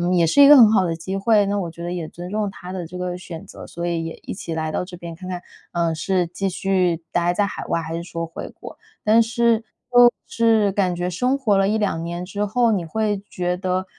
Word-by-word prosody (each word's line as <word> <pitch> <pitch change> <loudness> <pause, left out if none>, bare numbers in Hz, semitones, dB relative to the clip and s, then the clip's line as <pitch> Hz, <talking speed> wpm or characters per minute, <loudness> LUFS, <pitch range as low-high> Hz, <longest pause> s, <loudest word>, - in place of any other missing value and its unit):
也 170 -1 +4
是 165 - +4
一 280 - +10
个 295 - +10
很 230 -6 +8
好 190 -4 +3
的 165 -1 -1
机 185 +4 -4
会， 205 +1 +3
那 200 0 0
我 175 -3 -3
觉 170 +1 -10
得 175 - -3
也 175 -3 -4
尊 175 +3 -9
重 210 -1 -1
他 180 -1 -10
的 185 -2 -5
这 180 +2 -8
个 180 0 -3
选 175 0 -9
择， - - -11
所 170 0 -5
以 170 -1 -1
也 165 - -5
一 - - -5
起 170 -3 -6
来 160 -1 -2
到 180 - -2
这 180 -1 -10
边 170 -1 -8
看 185 +2 -10
看， 180 -1 -4 0.3
呃， 170 -1 0
是 180 +2 0
继 195 +3 -3
续 185 -2 0
呆 175 0 +1
在 205 +3 +1
海 - - -6
外 165 - -1
还 165 0 -5
是 170 - -4
说 165 -1 -4
回 165 - -7
国。 - - -12 0.3
但 220 +2 +5
是 230 0 +2 0.3
就 245 0 +9 0.2
是 225 -3 +2
感 185 -2 0
觉 175 +1 -2
生 250 +10 0
活 230 -7 +2
了 195 0 +3
1、2 205 -6 0
年 170 +1 -4
之 205 +3 -3
后， 235 +3 +2
你 195 -5 0
会 205 +4 -1
觉 180 0 -2
得， 185 0 -2
185 Hz, 265 characters per minute, -22 LUFS, 170-210 Hz, 0.3 s, 一